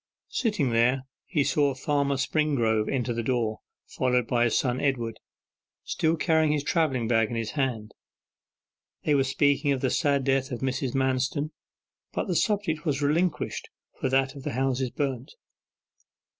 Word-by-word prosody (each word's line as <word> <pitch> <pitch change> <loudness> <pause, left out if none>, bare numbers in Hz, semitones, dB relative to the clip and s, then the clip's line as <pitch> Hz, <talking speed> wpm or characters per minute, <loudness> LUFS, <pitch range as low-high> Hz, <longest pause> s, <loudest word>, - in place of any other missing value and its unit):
Sitting 205 - 0
there 125 +3 +3 0.2
he 150 -6 +1
saw 140 -1 +2
Farmer 140 0 0
Springrove 125 -7 +1
enter 125 -3 -1
the 115 - -2
door, 115 -3 -1 0.3
followed 125 -2 0
by 120 0 +2
his 115 - +2
son 125 -1 0
Edward, 120 -5 -1 0.6
still 160 +1 +1
carrying 160 -2 +3
his 150 -2 0
travelling 140 -9 +1
bag 115 -2 +2
in 120 - -4
his 115 -1 -2
hand. 125 -7 -2 1.1
They 150 - +2
were 140 -2 +4
speaking 145 +2 +2
of 130 - -3
the 130 - +1
sad 140 -3 +2
death 135 0 +1
of 120 - -4
Mrs. 130 -1 -1
Manston, 135 +3 0 0.6
but - - -1
the 185 -5 -2
subject 200 -6 0
was 145 -3 -1
relinquished 160 +3 0 0.3
for 130 - 0
that 135 0 +2
of 140 - -9
the - - -4
houses 130 0 0
burnt. 135 -2 -3
135 Hz, 155 wpm, -27 LUFS, 125-145 Hz, 1.1 s, were